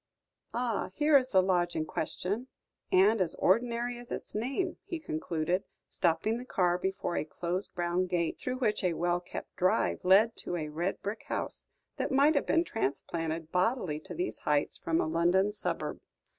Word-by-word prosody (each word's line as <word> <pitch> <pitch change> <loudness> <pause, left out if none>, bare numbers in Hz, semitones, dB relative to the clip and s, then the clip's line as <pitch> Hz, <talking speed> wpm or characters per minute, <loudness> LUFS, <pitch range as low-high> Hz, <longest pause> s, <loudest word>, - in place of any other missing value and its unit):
Ah! 235 -3 -1
here 300 0 +4
is 260 -2 +5
the 190 -4 +5
lodge 175 -2 +1
in 155 - 0
question 200 +10 -3 0.4
and 200 +3 +5
as 170 -3 +1
ordinary 235 +4 +1
as 240 - -12
its - - -5
name," 275 - -1
he 370 -3 -4
concluded, 170 - -1 0.3
stopping 205 +7 +1
the - - -6
car 180 -7 +1
before 190 -2 -2
a - - 0
closed 175 +5 -4
brown 175 +1 0
gate, 170 -2 -1
through 255 0 -3
which 225 -6 0
a 180 -2 +2
well 175 +1 +1
kept 175 - -8
drive 185 0 +2
led 200 +5 +5
to - - -4
a 155 -3 -3
red 170 +5 -2
brick 205 +2 -4
house, - - -4 0.3
that - - -1
might 280 +3 +5
have 285 - +1
been 330 - +4
transplanted 165 - -3
bodily 180 - +1
to - - -9
these 360 +1 -3
heights, 145 -1 +1
from 165 0 0
a - - +2
London 175 +5 +3
suburb. 210 - -3
185 Hz, 175 wpm, -31 LUFS, 170-235 Hz, 0.4 s, is